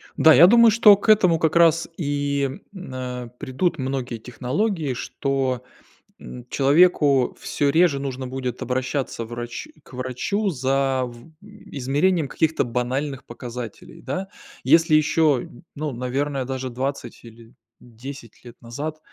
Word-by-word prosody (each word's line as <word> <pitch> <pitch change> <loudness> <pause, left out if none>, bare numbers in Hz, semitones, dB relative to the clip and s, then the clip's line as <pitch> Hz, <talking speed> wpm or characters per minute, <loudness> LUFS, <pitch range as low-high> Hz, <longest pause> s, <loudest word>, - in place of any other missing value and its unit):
Да, 160 - +6
я 165 +6 +8
думаю, 235 +2 +6
что 215 -2 +7
к 205 - -4
этому 185 -6 +5
как 160 0 +1
раз 165 -1 +4
и, 145 -3 -1 0.2
э, 125 -8 -6
придут 165 +6 -1
многие 130 -3 -3
технологии, 140 - -2
что, 130 0 -2 0.6
м, 60 0 -10
человеку 140 -2 +3
всё 145 - -1
реже 160 -1 +3
нужно 135 -1 -5
будет 125 -1 -5
обращаться 130 -1 -2
врач 120 - -7 0.2
к - - -19
врачу 130 - -2
за, 135 -3 0
в 120 +5 -12
измерением 165 -5 -1
каких-то 160 +4 0
банальных 130 +3 -3
показателей, 120 +6 -9
да. 190 +1 -4 0.4
Если 165 -1 +4
еще, 155 -3 +2 0.3
ну, 150 0 -3
наверное, 130 +2 -2
даже 130 0 -4
20 130 -1 -5
или 115 0 -15 0.3
10 120 +1 -11
лет 120 -1 -14
назад, 145 +7 -6
135 Hz, 130 wpm, -22 LUFS, 125-160 Hz, 0.6 s, я